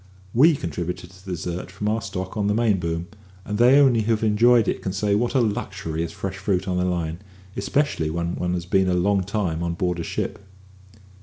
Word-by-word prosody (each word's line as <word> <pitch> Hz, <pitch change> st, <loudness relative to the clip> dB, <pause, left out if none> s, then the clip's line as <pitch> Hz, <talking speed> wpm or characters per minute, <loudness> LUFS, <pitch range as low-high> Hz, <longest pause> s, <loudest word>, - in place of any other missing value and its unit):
We 155 Hz, +7 st, +6 dB
contributed 90 Hz, -, -5 dB
to 95 Hz, 0 st, -17 dB
the 95 Hz, -2 st, -5 dB
dessert 85 Hz, +1 st, -4 dB
from 100 Hz, +2 st, -4 dB
our 110 Hz, +2 st, 0 dB
stock 95 Hz, -1 st, -5 dB
on 105 Hz, -2 st, 0 dB
the 105 Hz, -, +1 dB
main 110 Hz, -4 st, +2 dB
boom; 85 Hz, 0 st, -2 dB, 0.4 s
and 105 Hz, 0 st, -3 dB
they 125 Hz, +4 st, +7 dB
only 130 Hz, -5 st, +5 dB
who 115 Hz, +2 st, +1 dB
have 110 Hz, -, -1 dB
enjoyed 115 Hz, +1 st, +4 dB
it -, -, -1 dB
can 95 Hz, -, -3 dB
say 100 Hz, +1 st, 0 dB
what 120 Hz, +6 st, 0 dB
a 130 Hz, -, +5 dB
luxury 80 Hz, -7 st, -2 dB
is 85 Hz, -1 st, -3 dB
fresh 95 Hz, +2 st, -5 dB
fruit 95 Hz, -1 st, 0 dB
on 90 Hz, -1 st, 0 dB
the 90 Hz, -, +1 dB
line, 85 Hz, -2 st, -2 dB, 0.4 s
especially 140 Hz, -, 0 dB
when 85 Hz, +2 st, -2 dB
one 90 Hz, 0 st, -1 dB
has 85 Hz, -1 st, -4 dB
been 95 Hz, 0 st, +2 dB
a 90 Hz, -, +2 dB
long 95 Hz, +2 st, +2 dB
time 90 Hz, -4 st, -2 dB
on 85 Hz, 0 st, -2 dB
board 90 Hz, -1 st, -1 dB
a -, -, -2 dB
ship. -, -, -3 dB
95 Hz, 225 wpm, -23 LUFS, 90-105 Hz, 0.4 s, they